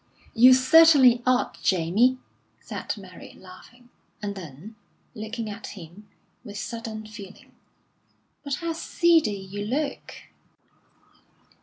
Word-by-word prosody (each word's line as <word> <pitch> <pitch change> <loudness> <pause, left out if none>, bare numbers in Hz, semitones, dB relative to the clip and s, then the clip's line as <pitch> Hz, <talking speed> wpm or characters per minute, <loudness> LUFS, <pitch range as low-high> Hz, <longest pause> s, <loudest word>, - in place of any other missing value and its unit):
"You 255 +2 +7
certainly 260 -2 +6
ought, 255 0 0
Jamie," 195 +8 +2 0.4
said - - -6
Mary, 185 -3 -13
laughing; 240 +7 -16 0.3
and 205 -1 -4
then, 180 +3 -11 0.4
looking 220 0 -6
at 210 0 -8
him, 185 +4 -13 0.3
with 205 -4 -9
sudden 220 +1 -6
feeling: 210 -3 -12 0.9
"But 280 -2 -2
how 335 +2 -4
seedy 325 - +2
you 195 +1 -7
look!" 280 +6 -4
220 Hz, 105 wpm, -25 LUFS, 200-255 Hz, 0.9 s, You